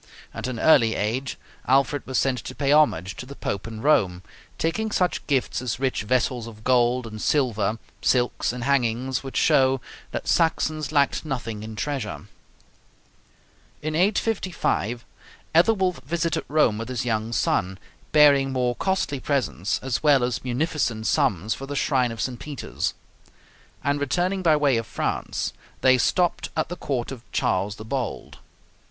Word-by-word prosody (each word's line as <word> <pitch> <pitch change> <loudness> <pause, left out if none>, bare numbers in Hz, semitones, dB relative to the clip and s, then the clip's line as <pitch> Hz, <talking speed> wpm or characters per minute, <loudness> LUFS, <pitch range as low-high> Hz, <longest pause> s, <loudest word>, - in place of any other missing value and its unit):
At - - -4
an 125 -3 -4
early 115 -7 +5
age 125 +6 -2 0.3
Alfred 135 +2 +2
was 130 -1 -1
sent 130 -2 +1
to 130 - -6
pay 140 -1 0
homage 100 - +3
to 125 - -7
the 140 - -9
Pope 100 -4 -4
in 110 -1 -7
Rome, 95 -12 +2 0.3
taking 220 +7 -1
such 180 -4 0
gifts 135 -4 0
as 125 -2 -3
rich 130 -4 0
vessels 120 +1 0
of 110 -1 -12
gold 125 0 +3
and 110 -1 -7
silver, 115 -7 +1 0.2
silks, 125 -2 +1
and 125 0 -5
hangings, 130 -1 +1
which 135 -1 -6
show 135 -3 +4 0.3
that - - -5
Saxons 155 -2 +1
lacked 140 -2 +2
nothing 120 -8 -4
in 110 0 -7
treasure. 120 -6 -4 1.6
In 155 0 -2
855 180 - 0 0.5
Ethelwulf 180 -3 +3
visited 165 +2 -1
Rome 140 -8 +2
with 115 - -5
his 125 -2 -2
young 110 -1 -1
son, 95 -4 0 0.3
bearing 140 -3 +5
more 125 -2 0
costly 190 -6 -1
presents, 110 - -1
as 130 -2 -1
well 145 -4 +4
as 125 -2 -1
munificent 125 -4 -1
sums 110 - +1
for 135 - -7
the 145 - -4
shrine 130 -4 +1
of 115 - -8
St. 125 -2 -2
Peter's; 150 -3 -4 0.9
and 140 +2 +1
returning 175 +7 0
by 165 -4 +4
way 145 -5 +3
of 115 - -3
France, - - -2 0.3
they 130 -1 +5
stopped 175 +4 +1
at - - 0
the 175 - -4
court 135 -7 -3
of 130 -4 -7
Charles 100 +2 0
the 110 - -10
Bold. 125 0 -4
130 Hz, 155 wpm, -24 LUFS, 115-150 Hz, 1.6 s, early